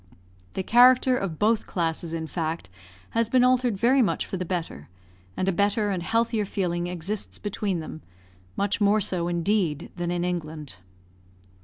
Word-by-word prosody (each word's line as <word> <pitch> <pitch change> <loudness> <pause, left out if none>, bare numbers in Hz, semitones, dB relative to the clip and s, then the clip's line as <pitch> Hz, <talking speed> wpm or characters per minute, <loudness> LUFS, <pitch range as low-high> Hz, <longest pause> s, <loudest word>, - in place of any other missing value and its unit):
The 190 - -1
character 250 +3 +6
of 195 -9 -3
both 215 +3 +2
classes, 165 -1 -2
in 165 -1 -3
fact, 160 - -3 0.4
has 230 -1 +1
been 255 0 +4
altered 250 -4 +3
very 255 +6 +4
much 220 - 0
for - - -5
the 180 -1 -3
better, 165 - -4 0.5
and 185 - -1
a - - +4
better 205 +3 +1
and 185 -3 -2
healthier 225 +3 +1
feeling 175 -3 -2
exists 180 +4 -4
between 200 -4 -2
them 155 0 -8 0.6
much 205 +2 0
more 205 +1 +4
so, 180 -4 0
indeed, 175 -2 0
than 175 0 -2
in 175 0 -1
England. 155 - -4
190 Hz, 160 wpm, -26 LUFS, 170-215 Hz, 0.6 s, character